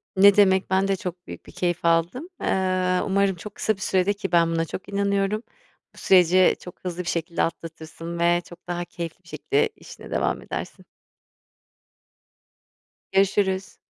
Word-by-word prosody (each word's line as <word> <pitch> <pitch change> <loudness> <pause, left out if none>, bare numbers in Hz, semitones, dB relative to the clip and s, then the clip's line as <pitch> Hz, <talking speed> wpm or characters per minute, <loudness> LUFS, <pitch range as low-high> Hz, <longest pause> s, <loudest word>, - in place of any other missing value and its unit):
Ne 200 +1 +7
demek? 190 -2 +4
Ben 190 +1 +2
de 195 - +1
çok 180 -1 -7
büyük - - -9
bir - - -13
keyif 175 -1 -2
aldım. 170 - +1
Eee, 185 -1 +1
umarım 195 -1 +2
çok 200 +4 -10
kısa 220 - 0
bir 190 - -16
süredir, 190 +1 +1
ki 195 -2 -5
ben 170 -1 +4
buna 165 0 0
çok 185 - -8
inanıyorum, 200 +2 0 0.5
bu - - -21
süreci 185 0 +5
çok 180 - -12
hızlı 180 0 -4
bir 175 - -11
şekilde 170 0 -1
atlatırsın 165 +1 -6
ve 175 0 +3
çok 175 +1 -15
daha 175 0 -3
keyifli 170 +1 -7
bir - - -23
şekilde 435 +2 0
işine - - -13
devam - - 0
edersin. - - -7 2.3
Görüşürüz. 195 0 +1
185 Hz, 160 wpm, -24 LUFS, 170-195 Hz, 2.3 s, Ne